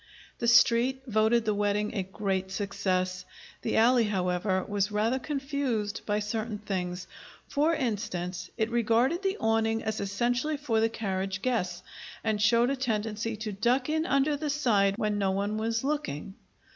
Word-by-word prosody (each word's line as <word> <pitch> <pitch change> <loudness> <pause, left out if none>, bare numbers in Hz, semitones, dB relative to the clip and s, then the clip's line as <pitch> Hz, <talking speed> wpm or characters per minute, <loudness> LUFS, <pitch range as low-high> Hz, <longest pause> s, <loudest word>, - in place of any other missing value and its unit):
The 235 - -1
Street 240 +3 +4
voted 220 0 +2
the 215 - +2
wedding 205 +1 0
a 205 - -1
great 190 0 -2
success. 185 -2 -1 0.4
The - - -1
alley, 235 +1 +5
however, 185 -1 0
was 205 0 0
rather 220 +5 +1
confused 270 -7 -2
by 205 -1 +1
certain 215 +1 -3
things. 180 -3 -4 0.4
For 310 +3 +2
instance, 205 - -3
it 220 +1 0
regarded 240 - +2
the 390 +1 -1
awning 225 0 +1
as 220 0 -2
essentially 240 +9 0
for 255 -6 0
the 225 +1 +3
carriage 195 -3 -3
guests, 185 -9 -1 0.4
and 215 -2 0
showed 235 +4 +4
a - - 0
tendency 225 -3 -2
to 215 0 -4
duck 245 +7 +1
in 315 +1 0
under 275 +2 +2
the 300 +1 -3
side 215 -9 +2
when 210 -2 0
no 195 -1 +1
one 200 +2 -1
was 225 +1 -1
looking. 270 - -3
220 Hz, 160 wpm, -28 LUFS, 200-245 Hz, 0.4 s, alley